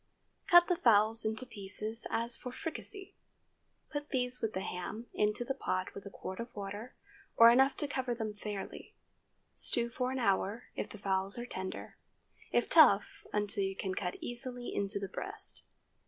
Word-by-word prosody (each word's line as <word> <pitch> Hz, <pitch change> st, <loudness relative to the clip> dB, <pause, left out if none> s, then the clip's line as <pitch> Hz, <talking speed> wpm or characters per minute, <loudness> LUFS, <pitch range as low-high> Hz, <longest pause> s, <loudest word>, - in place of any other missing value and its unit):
Cut 350 Hz, -1 st, +8 dB
the 355 Hz, -1 st, +1 dB
fowls 220 Hz, -2 st, +4 dB
into 220 Hz, +3 st, -1 dB
pieces 215 Hz, 0 st, -5 dB
as 230 Hz, +1 st, +1 dB
for 250 Hz, -, -7 dB
fricassee. 380 Hz, -, -3 dB, 0.8 s
Put 290 Hz, 0 st, -4 dB
these 250 Hz, -1 st, 0 dB
with 220 Hz, -1 st, -1 dB
the 190 Hz, -, -2 dB
ham 215 Hz, +6 st, -5 dB
into 210 Hz, +3 st, +1 dB
the 270 Hz, -, -1 dB
pot 185 Hz, -7 st, -2 dB
with 200 Hz, 0 st, -8 dB
a -, -, -6 dB
quart 190 Hz, -1 st, -7 dB
of 235 Hz, +1 st, -6 dB
water, 205 Hz, +4 st, -6 dB, 0.4 s
or 230 Hz, 0 st, +9 dB
enough 265 Hz, +3 st, +4 dB
to 295 Hz, -, +2 dB
cover 260 Hz, -3 st, -2 dB
them 220 Hz, -2 st, -3 dB
fairly. 205 Hz, -1 st, -7 dB, 0.6 s
Stew 235 Hz, 0 st, +1 dB
for 250 Hz, +1 st, -1 dB
an 265 Hz, -, -2 dB
hour, 205 Hz, 0 st, +1 dB
if -, -, -3 dB
the -, -, -9 dB
fowls 195 Hz, 0 st, -1 dB
are 240 Hz, -, -4 dB
tender; 190 Hz, -6 st, -6 dB, 0.5 s
if 240 Hz, -, +2 dB
tough, 255 Hz, -11 st, +5 dB
until 205 Hz, 0 st, 0 dB
you 195 Hz, 0 st, -2 dB
can 190 Hz, -1 st, -3 dB
cut 180 Hz, -1 st, -2 dB
easily 245 Hz, 0 st, -5 dB
into 200 Hz, +1 st, -1 dB
the 200 Hz, -1 st, -3 dB
breast. 395 Hz, -, -2 dB
225 Hz, 170 wpm, -33 LUFS, 200-250 Hz, 0.8 s, or